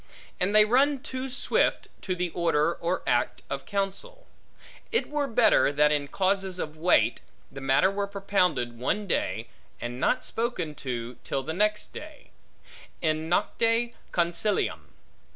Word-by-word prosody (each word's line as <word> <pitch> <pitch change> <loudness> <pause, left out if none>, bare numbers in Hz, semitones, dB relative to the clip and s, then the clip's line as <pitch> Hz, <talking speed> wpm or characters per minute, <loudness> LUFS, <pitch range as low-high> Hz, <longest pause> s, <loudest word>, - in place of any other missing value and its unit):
And 200 +3 +1
they 215 0 +8
run 270 +4 +3
too 260 -2 -4
swift, 260 - +1
to 185 - -2
the 180 -1 -2
order, 165 -2 +1
or 170 +2 -2
act, 120 - 0
of 135 -1 -4
counsel. 205 - -3 0.7
It 460 - +1
were 295 -1 0
better 230 - +4
that 150 +1 +3
in 145 -1 0
causes 190 +2 0
of 155 -3 -4
weight, 170 +3 +3 0.3
the 135 - -8
matter 135 +7 +3
were 200 0 -2
propounded 180 - 0
one 205 +12 -1
day, 110 - -1 0.3
and 120 +1 -5
not 255 - +1
spoken 225 -10 -2
to 120 -3 -5
till 135 - -2
the 160 - -4
next 210 +4 0
day; 305 -1 -11 0.7
in 155 0 -1
nocte 230 +6 +1 0.2
consilium. 175 +4 0
180 Hz, 145 wpm, -27 LUFS, 150-215 Hz, 0.7 s, they